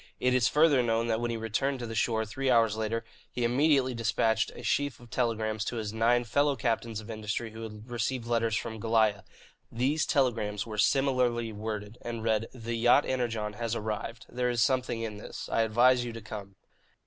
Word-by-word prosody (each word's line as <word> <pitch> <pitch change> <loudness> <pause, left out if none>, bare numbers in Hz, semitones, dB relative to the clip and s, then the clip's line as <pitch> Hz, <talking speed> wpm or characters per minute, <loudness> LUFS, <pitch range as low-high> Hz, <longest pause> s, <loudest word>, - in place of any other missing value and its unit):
It 125 0 +2
is 125 -1 +4
further 150 -2 +4
known 115 -1 +1
that 110 0 0
when 120 - -1
he 115 - -2
returned 115 +5 -1
to 120 - -5
the 115 - -6
shore, 110 -1 +1
three 130 +5 -2
hours 115 -3 +4
later, 110 +1 -2 0.3
he 125 - -2
immediately 130 +1 +3
despatched 110 -1 +1
a 120 - -9
sheaf 145 +5 0
of 120 -2 -16
telegrams 110 -3 0
to 120 - -3
his 110 -2 -3
nine 120 +2 +3
fellow 140 +5 +2
captains 115 -2 -1
of 110 +1 -8
industry 110 +1 -3
who 110 +1 -9
had 110 0 -8
received 120 +1 -2
letters 115 -2 +1
from 110 0 -4
Goliah. 110 -3 +2 0.5
These 135 +7 0
telegrams 115 -7 +1
were 110 -2 -6
similarly 120 -1 +2
worded, 105 +1 -5
and 115 -2 -5
read: 110 0 +1
"The 120 -2 -5
yacht 120 +5 +4
Energon 115 -5 -2
has 115 +1 -3
arrived. 110 +1 -4
There 125 0 -1
is 120 -2 +2
something 125 -3 0
in 110 -2 -4
this. 105 - -8
I - - +2
advise 120 +3 +4
you 120 -1 -5
to 115 - -7
come." 100 -3 -8
115 Hz, 195 wpm, -29 LUFS, 110-125 Hz, 0.5 s, is